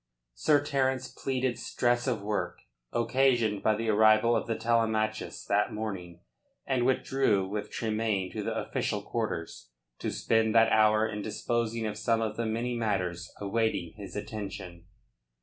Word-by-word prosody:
Sir 145 - +3
Terence 130 -2 0
pleaded 130 -2 -2
stress 120 +1 0
of 115 -6 -1
work, 105 0 -2 0.3
occasioned 120 -3 +2
by 110 - +3
the 115 +1 -2
arrival 110 +2 +5
of - - -1
the 115 - 0
Telemachus 110 -1 0
that 105 +1 +2
morning, 95 -6 -5 0.4
and 130 -2 +1
withdrew 130 -7 +2
with 105 +2 -4
Tremayne 110 -4 -1
to - - -4
the - - -2
official - - -2
quarters, 80 -7 -4 0.3
to - - -2
spend 110 0 +1
that 115 0 +6
hour 110 0 +4
in 105 -1 -4
disposing 115 +1 -1
of 105 0 -3
some 115 +1 +2
of 110 -1 -2
the 115 0 -2
many 120 +2 -1
matters 95 -5 -2
awaiting 100 -4 -1
his 100 -3 -9
attention. 100 -4 -6
110 Hz, 150 wpm, -29 LUFS, 105-120 Hz, 0.4 s, that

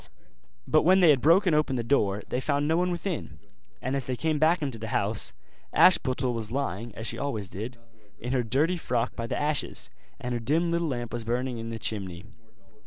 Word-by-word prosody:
But - - +4
when 185 +4 +5
they 175 -4 +7
had 135 -4 +2
broken 170 +4 +5
open 150 -3 +2
the 120 - -1
door 105 -5 +1
they 125 - -2
found 145 +1 0
no 160 - +2
one 180 +1 +2
within; 175 0 -4 0.5
and 130 +2 -1
as 135 -3 -2
they 130 - -1
came 155 +3 0
back 160 +2 +3
into 130 -5 -3
the 110 - -5
house, - - +1 0.4
Ashputtel 130 -8 +4
was 115 -2 -3
lying, 120 -4 -2
as 110 - -6
she 115 0 -2
always 110 -9 -3
did, 115 +7 -6 0.4
in 125 +4 -4
her 130 - +2
dirty 145 +10 +1
frock 125 -6 -1
by 115 -1 -4
the - - -2
ashes, 145 - -1 0.3
and 125 0 -3
her 120 - -1
dim 160 +8 +1
little 170 0 0
lamp 120 -5 -3
was 120 -1 -2
burning 120 +1 -2
in 115 0 -5
the 115 - -4
chimney. 95 -5 -4
130 Hz, 210 wpm, -27 LUFS, 115-155 Hz, 0.5 s, they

